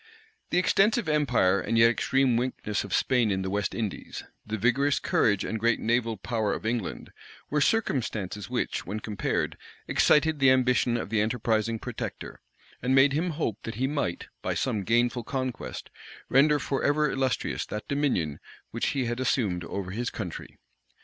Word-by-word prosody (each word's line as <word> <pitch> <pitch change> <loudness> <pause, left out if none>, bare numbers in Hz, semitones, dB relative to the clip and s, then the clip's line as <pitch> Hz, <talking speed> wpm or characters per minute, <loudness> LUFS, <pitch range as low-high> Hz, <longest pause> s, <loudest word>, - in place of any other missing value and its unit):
The - - +1
extensive 200 +3 +3
empire 125 -11 +2
and 115 - -1
yet 115 +1 +7
extreme 135 0 +2
weakness 120 -3 -1
of - - -9
Spain 125 -4 +2
in 95 -1 0
the 95 - -3
West 100 -1 -1
Indies, 110 -5 -4 0.2
the 110 +1 -4
vigorous 140 +6 +2
courage 100 -3 +1
and 110 - -3
great 115 +1 +2
naval 115 -1 0
power 105 +2 -1
of - - -5
England, 115 -4 -3 0.4
were 150 0 +2
circumstances 110 - -1
which, - - -2
when 105 +4 -4
compared, 105 -2 -2 0.3
excited 155 0 +3
the 135 -1 +6
ambition 125 -2 +3
of 115 - -4
the 110 -2 +2
enterprising 110 0 0
protector, - - -6 0.4
and 130 +2 +2
made 135 +1 +5
him 165 +5 0
hope 145 - -2
that 115 - -6
he 130 +4 0
might, 135 - -2 0.2
by - - -2
some 105 -2 -1
gainful 120 +1 +2
conquest, 130 0 -4 0.4
render 145 +3 +5
forever 145 +1 +1
illustrious 135 -1 -1
that 105 - -6
dominion 130 - 0 0.3
which - - -1
he 130 - +1
had 120 +1 -2
assumed 105 -9 0
over 95 +1 -5
his 120 +4 -2
country. 90 -7 -7
120 Hz, 165 wpm, -27 LUFS, 105-135 Hz, 0.4 s, yet